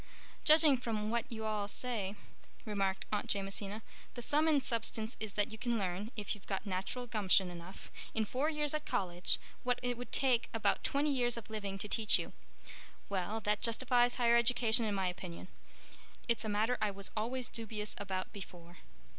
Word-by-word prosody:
"Judging 305 -3 +7
from 220 -3 -2
what 235 0 -1
you 220 -1 -4
all, 210 -2 -1
say" 210 -3 -1 0.5
remarked 195 -3 -1
Aunt 210 -1 -1
Jamesina, 200 +2 -2 0.3
"the 240 - -4
sum 300 +6 +3
and 295 -4 +3
substance 225 -1 -1
is 215 -2 -4
that 205 +1 0
you 220 - -8
can 240 0 0
learn—if 205 +3 -3
you've 205 - -11
got 195 +1 -3
natural 195 +6 -3
gumption 195 -5 +2
enough—in 185 +5 -6
four 265 +8 0
years 300 -2 0
at 305 0 -1
college 175 -1 +1 0.2
what 250 0 0
it 245 -1 -1
would 245 - -7
take 255 -4 +3
about 225 - +1
twenty 290 +1 +1
years 245 -2 +2
of 225 -1 -8
living 200 -3 -4
to 210 - -4
teach 215 0 +4
you. - - -5 0.8
Well, 200 +3 -2
that 210 0 0
justifies 245 +1 +4
higher 235 -1 +4
education 235 -1 +4
in 210 -2 -1
my 190 -1 0
opinion. 180 0 -5 0.8
It's 235 -1 +1
a 220 - -3
matter 220 +4 +1
I 210 - +2
was 200 -1 -3
always 240 +3 -1
dubious 215 -3 -1
about 190 -2 -4
before." 175 -3 -10
220 Hz, 175 wpm, -34 LUFS, 200-245 Hz, 0.8 s, Judging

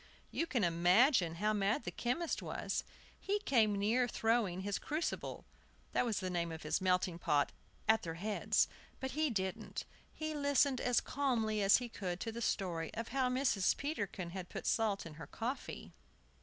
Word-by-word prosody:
You 335 - -1
can 245 -9 0
imagine 175 - +4
how 210 +5 +1
mad 205 +2 +1
the - - -4
chemist 310 +8 -1
was! - - -2 0.4
He 405 +1 0
came 220 - +3
near 225 +5 +2
throwing 225 -6 +1
his 200 +1 -2
crucible 310 +3 -3 0.5
that - - +2
was 225 -4 0
the 185 - -2
name 170 -1 -1
of 160 - -7
his 155 +4 0
melting 180 -2 +1
pot 145 -4 +2 0.4
at 220 0 +5
their 165 -1 -5
heads. 205 +4 +1 0.3
But 265 0 -3
he 310 +1 +1
didn't. 190 -5 -3 0.3
He 310 0 -4
listened 285 -2 +2
as 245 -1 +3
calmly 230 -6 0
as 195 0 +7
he 245 - -4
could 185 -6 -4
to 225 - -2
the 235 +1 -6
story 175 -7 -1
of 230 +1 -4
how 260 0 +1
Mrs. 250 -7 +2
Peterkin 200 - -3
had 185 -1 -6
put - - -6
salt 215 -5 +1
in 165 - -8
her - - -7
coffee. 245 +5 -5
215 Hz, 175 wpm, -35 LUFS, 185-255 Hz, 0.5 s, as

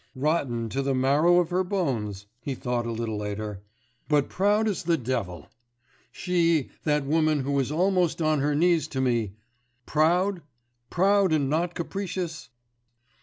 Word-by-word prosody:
'Rotten 130 -5 0
to 135 +5 -2
the 135 -1 0
marrow 145 +7 +4
of 175 -1 -1
her 185 +1 +1
bones,' 120 - -2
he 135 +2 -4
thought 120 -2 -2
a - - -2
little 115 -1 -3
later... 105 -1 -5 0.5
'but 145 -2 +2
proud 205 +3 +2
as 205 -4 -1
the 170 0 +1
devil! 115 - -3 0.7
She, 170 -5 +1
that 150 -2 +1
woman 155 0 +2
who 140 +1 0
is 135 +1 -1
almost 180 +1 +1
on 155 -2 +2
her 145 +1 +1
knees 170 +1 +2
to 135 - -4
me, 120 -6 0 0.5
proud? 175 +5 +2 0.5
proud 195 0 +3
and 145 -3 +1
not 170 +3 0
capricious? 175 -2 -4
150 Hz, 150 wpm, -26 LUFS, 130-175 Hz, 0.7 s, marrow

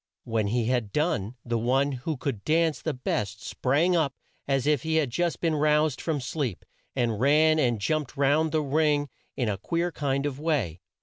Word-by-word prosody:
When 110 -2 -1
he 115 +2 0
had 120 -4 0
done, 120 - 0
the 115 -1 0
one 135 +5 +2
who 135 +4 -3
could 125 -6 -4
dance 160 -1 +2
the 160 -4 -2
best 110 -3 -3
sprang 155 +8 +1
up 150 -5 +1 0.3
as 135 -2 +1
if 150 -3 +2
he 160 0 -1
had 150 -6 +1
just 175 +4 0
been 165 -2 +1
roused 150 -2 +2
from 160 -3 -1
sleep, 125 - -3 0.3
and 120 -5 0
ran 155 +4 +4
and 120 -6 +2
jumped 150 +5 -1
round 145 +3 +3
the 155 -1 +1
ring 145 0 +1 0.3
in 125 - 0
a 100 -2 -1
queer 170 - -1
kind 140 -2 -1
of 140 -2 -3
way. 135 - -1
140 Hz, 190 wpm, -27 LUFS, 120-155 Hz, 0.3 s, ran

